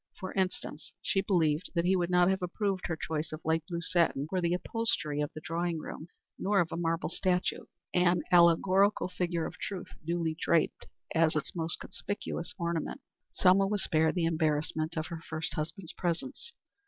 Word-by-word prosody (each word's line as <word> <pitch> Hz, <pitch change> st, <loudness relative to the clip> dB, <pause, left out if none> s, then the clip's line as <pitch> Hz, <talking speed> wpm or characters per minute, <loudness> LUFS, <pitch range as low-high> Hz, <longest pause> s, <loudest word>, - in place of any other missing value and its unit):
For 185 Hz, -, -5 dB
instance, 185 Hz, -4 st, -2 dB
she 195 Hz, -, +2 dB
believed 165 Hz, -4 st, +1 dB
that 170 Hz, 0 st, +2 dB
he 190 Hz, +1 st, +4 dB
would 175 Hz, -1 st, +1 dB
not 180 Hz, 0 st, +5 dB
have 190 Hz, 0 st, +1 dB
approved 190 Hz, +1 st, -1 dB
her 160 Hz, -, -1 dB
choice 160 Hz, -1 st, -3 dB
of 155 Hz, +1 st, -7 dB
light 160 Hz, 0 st, +2 dB
blue 170 Hz, -1 st, -2 dB
satin 165 Hz, -5 st, +2 dB
for 185 Hz, +2 st, -1 dB
the 170 Hz, 0 st, +2 dB
upholstery 180 Hz, -8 st, -1 dB
of 145 Hz, -, -1 dB
the 155 Hz, -, -6 dB
drawing 170 Hz, +1 st, -1 dB
room, 155 Hz, +1 st, -7 dB, 0.3 s
nor 200 Hz, 0 st, +2 dB
of 170 Hz, -1 st, +1 dB
a -, -, -2 dB
marble 165 Hz, 0 st, 0 dB
statue 180 Hz, -1 st, 0 dB, 0.3 s
an 180 Hz, 0 st, +3 dB
allegorical 185 Hz, +4 st, +5 dB
figure 175 Hz, -2 st, -1 dB
of -, -, -7 dB
Truth, 190 Hz, -3 st, -5 dB
duly 165 Hz, -1 st, -1 dB
draped, 165 Hz, -2 st, +1 dB, 0.3 s
as 160 Hz, -1 st, +3 dB
its 155 Hz, -, -2 dB
most 165 Hz, -1 st, -1 dB
conspicuous 180 Hz, -4 st, -4 dB
ornament. 170 Hz, -3 st, -2 dB, 0.3 s
Selma 195 Hz, +1 st, +4 dB
was 205 Hz, -1 st, 0 dB
spared 160 Hz, 0 st, +2 dB
the 175 Hz, -2 st, +1 dB
embarrassment 155 Hz, 0 st, 0 dB
of 155 Hz, -, -1 dB
her 165 Hz, -1 st, -6 dB
first 160 Hz, 0 st, -4 dB
husband's 160 Hz, +2 st, -4 dB
presence. 265 Hz, -, -3 dB
170 Hz, 180 wpm, -31 LUFS, 160-185 Hz, 0.3 s, not